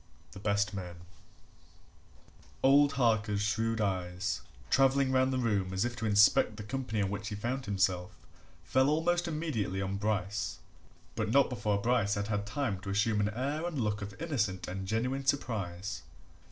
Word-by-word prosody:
THE - - -10
BEST 100 0 0
MAN 90 -3 -6 1.7
Old 140 +1 +6
Harker's 110 -5 +1
shrewd 115 +2 0
eyes, 95 -1 -1 0.3
travelling 135 0 +4
round 130 0 +3
the 130 - 0
room 105 -6 0
as 95 +4 +1
if 120 0 -3
to 115 -3 -2
inspect 105 +1 +5
the 105 - -6
company 110 -1 -2
in 100 -1 0
which 100 0 -4
he 105 - -4
found 125 +5 -3
himself, 95 -3 0 0.5
fell 130 +10 +3
almost 175 +3 +1
immediately 150 - -2
on 95 0 -2
Bryce 105 -1 -1 0.6
but 110 -2 -1
not 140 +3 +4
before 105 -4 0
Bryce 110 -2 +1
had 100 +1 -3
had 105 -1 -1
time 115 -4 -2
to 95 +1 -7
assume 105 +2 +1
an 105 0 +2
air 140 +8 -2
and 160 -5 -3
look 105 -2 -1
of 100 0 -7
innocent 110 - -1
and 95 +1 -5
genuine 125 +6 -1
surprise. 105 -8 -2
105 Hz, 165 wpm, -31 LUFS, 100-130 Hz, 1.7 s, Old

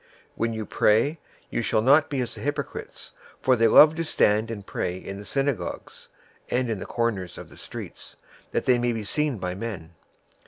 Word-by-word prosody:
006:005 - - -30 0.3
"When 115 0 -1
you 110 -1 -4
pray, 120 +13 +2 0.3
you - - -1
shall 110 -1 +1
not 145 +4 +5
be 140 -3 -1
as 120 - -3
the - - -9
hypocrites, 145 0 -5 0.3
for 130 - +3
they 115 -1 +4
love 150 +7 +8
to 165 - 0
stand 110 -7 +2
and 105 -4 -6
pray 90 -2 -3
in 95 +1 -7
the 100 - -9
synagogues 135 0 -3 0.4
and 125 -1 0
in 105 - -2
the - - -7
corners 105 -7 -2
of - - -10
the - - -15
streets, - - -9 0.3
that - - -2
they 125 -1 +4
may 120 0 +1
be 110 -1 -4
seen 150 +4 0
by 90 -2 -3
men. 95 -5 -6
115 Hz, 200 wpm, -25 LUFS, 105-135 Hz, 0.4 s, love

